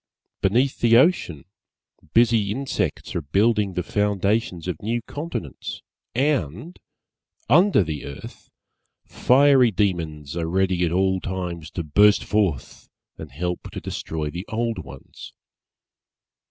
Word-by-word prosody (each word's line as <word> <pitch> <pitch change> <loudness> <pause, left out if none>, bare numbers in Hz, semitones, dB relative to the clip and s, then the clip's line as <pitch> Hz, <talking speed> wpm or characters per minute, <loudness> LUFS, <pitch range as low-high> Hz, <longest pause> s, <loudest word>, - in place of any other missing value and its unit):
Beneath 125 +8 +1
the 115 -1 +5
ocean 125 - +2 0.7
busy 115 -3 +4
insects 135 +5 -3
are 85 - -1
building 100 +5 +1
the 90 - -1
foundations 100 -2 -1
of 90 -4 -4
new 115 +3 -1
continents 145 - -6 0.3
and, 135 - -1 0.7
under 175 - +5
the 80 -4 -5
earth, 70 - -10 0.6
Fiery 135 -1 +4
Demons 85 -7 -2
are 85 -1 -2
ready 95 0 +1
at 80 - -2
all 95 +1 +1
times 90 -4 -5
to 85 - -5
burst 100 +7 +4
forth 95 -10 -2 0.3
and 80 -3 -9
help 90 +6 -4
to - - -4
destroy 75 -2 -4
the 90 +5 -7
old 115 0 -2
ones. 65 +1 -11
95 Hz, 120 wpm, -23 LUFS, 85-115 Hz, 0.7 s, the